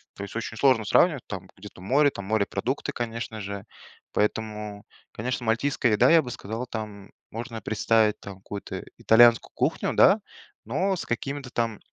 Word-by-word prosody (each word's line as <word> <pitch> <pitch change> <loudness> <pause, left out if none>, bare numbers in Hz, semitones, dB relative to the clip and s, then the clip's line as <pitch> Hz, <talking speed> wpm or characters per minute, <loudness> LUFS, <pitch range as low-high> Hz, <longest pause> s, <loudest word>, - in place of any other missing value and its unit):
То 100 - -7
есть 100 - -8
очень 115 0 -4
сложно 130 -6 +3
сравнивать, 150 - +3
там 95 -2 -6
где-то 95 -2 -12
море, 140 +8 +3
там 100 - -7
морепродукты, 110 +5 -1
конечно 115 -2 -4
же, 100 +1 -6 0.5
поэтому, 105 -1 -2 0.3
конечно, 120 +1 -3
мальтийская 115 0 +1
еда, 120 +4 +5
я 165 -1 +7
бы 125 -3 -7
сказал, 115 +2 -5
там 105 -4 -7 0.2
можно 115 0 -6
представить, 110 0 +2
там, 100 -1 -9
какую-то 100 +1 -7
итальянскую 115 +1 +5
кухню, - - 0
да, - - +6 0.5
но 185 - 0
с - - -5
какими-то 135 +2 -4
там, 115 -3 -2
115 Hz, 155 wpm, -26 LUFS, 105-125 Hz, 0.5 s, я